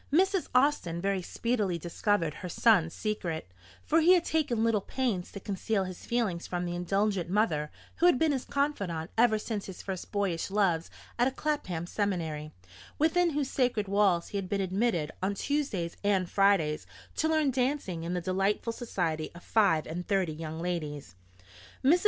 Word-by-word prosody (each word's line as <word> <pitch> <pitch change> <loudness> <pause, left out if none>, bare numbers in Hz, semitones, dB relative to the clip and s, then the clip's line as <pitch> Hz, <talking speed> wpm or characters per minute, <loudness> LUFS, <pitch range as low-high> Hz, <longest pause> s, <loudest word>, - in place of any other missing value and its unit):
Mrs. 380 +4 +3
Austin 250 - +2
very 195 +1 0
speedily 210 -2 -1
discovered 170 0 0
her 180 - -7
son's 175 -4 +4
secret; 170 - -3 0.3
for 325 +2 +3
he 350 +3 +7
had 345 - +1
taken 285 -8 +1
little 225 -3 +2
pains 220 -7 -2
to 200 - -7
conceal 200 +1 -1
his 185 -1 -8
feelings 215 -8 -1
from 175 0 -2
the 175 - -3
indulgent 190 +1 0
mother 170 -7 +1 0.3
who 350 - +5
had 350 - +5
been 315 +3 +3
his 265 -3 -1
confidante 200 - -2
ever 225 -1 +4
since 215 -1 -4
his 190 - -8
first 190 -2 -5
boyish 195 -5 -1
loves 190 -5 +1 0.3
at 245 - +4
a - - 0
Clapham 255 - -2
seminary, 165 -6 -2 0.5
within 340 +3 +3
whose 290 -3 -1
sacred 245 -6 +1
walls 195 -4 +2
he 200 - -2
had 185 -2 -6
been 200 0 0
admitted 190 -4 0
on 195 +2 0
Tuesdays 210 - -1
and 195 -3 +2
Fridays 195 -6 +2 0.3
to 315 - +2
learn 310 -3 +2
dancing 250 - -1
in 175 +2 -2
the 180 - -1
delightful 195 +5 0
society 170 -10 -2
of 175 - -11
five 195 -8 +3
and 175 +3 -5
thirty 190 -5 +1
young 160 0 -6
ladies. 155 - -4 0.7
Mrs. 330 +7 +6
195 Hz, 170 wpm, -29 LUFS, 175-240 Hz, 0.7 s, he